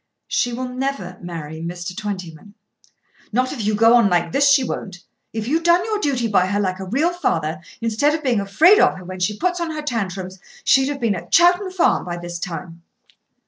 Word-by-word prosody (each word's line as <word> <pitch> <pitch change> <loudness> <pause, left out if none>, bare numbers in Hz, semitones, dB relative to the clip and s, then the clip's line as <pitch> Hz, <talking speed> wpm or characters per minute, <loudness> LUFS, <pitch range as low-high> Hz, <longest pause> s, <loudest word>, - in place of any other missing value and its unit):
"She 245 - 0
will 255 +2 -4
never 250 -8 -4
marry 160 -3 -7
Mr. 175 +1 -6
Twentyman." 195 -2 -7 0.8
"Not 255 +3 0
if 240 -6 -5
you 210 +1 +1
go 225 +2 +5
on 235 -4 +5
like 175 -2 +1
this 280 +5 +4
she 275 -1 +5
won't. 190 -7 -6 0.3
If 220 0 -4
you'd 320 +5 +1
done 345 +1 +3
your 430 -2 -1
duty 265 - 0
by 190 -4 +2
her 205 +2 -1
like 185 -2 -1
a 190 - -5
real 285 - 0
father 160 - -1 0.2
instead 230 +7 +1
of 315 - -6
being 245 -6 +1
afraid 320 - +5
of - - +3
her 185 - -10
when 185 +1 -7
she 205 +3 -1
puts 355 +3 -1
on 335 - -2
her 310 -1 -5
tantrums, 190 -7 -4 0.2
she'd 270 -1 +4
have 285 -1 -4
been 230 -3 +1
at 180 - -8
Chowton 355 +3 +4
Farm 370 -2 +2
by 175 -1 -5
this 175 0 -6
time." 170 -1 -7
215 Hz, 210 wpm, -21 LUFS, 180-280 Hz, 0.8 s, go